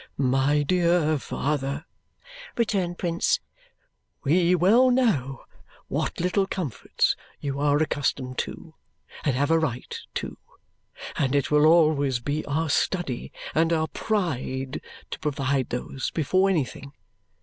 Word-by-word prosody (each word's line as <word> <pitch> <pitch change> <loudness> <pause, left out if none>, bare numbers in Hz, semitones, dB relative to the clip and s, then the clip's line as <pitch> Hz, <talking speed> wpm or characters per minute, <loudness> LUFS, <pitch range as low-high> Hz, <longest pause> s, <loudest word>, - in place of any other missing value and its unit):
"My 135 +2 +2
dear 170 -2 +2
father," 140 +2 -2 0.7
returned 195 -6 0
Prince, 175 - +1 0.8
"we 175 +4 +3
well 220 +9 +5
know 180 - +1 0.4
what - - -2
little 185 +3 +1
comforts 170 - -1 0.2
you 140 -1 -3
are 145 0 +3
accustomed 140 -4 -1
to 160 - -5 0.5
and 140 -5 +1
have 145 +4 +1
a 165 - +5
right 130 -6 -3 0.2
to, - - -4 0.8
and 135 0 +1
it 140 0 +1
will 150 +1 +5
always 150 -6 +4
be 145 +5 -2
our 155 +2 0
study 160 -7 -1 0.2
and 165 +1 +2
our 160 -1 +1
pride 135 - -2 0.3
to - - -5
provide 140 -3 -1
those 125 +2 -3
before 185 +5 +2
anything. 140 -4 -2
150 Hz, 120 wpm, -25 LUFS, 135-175 Hz, 0.8 s, well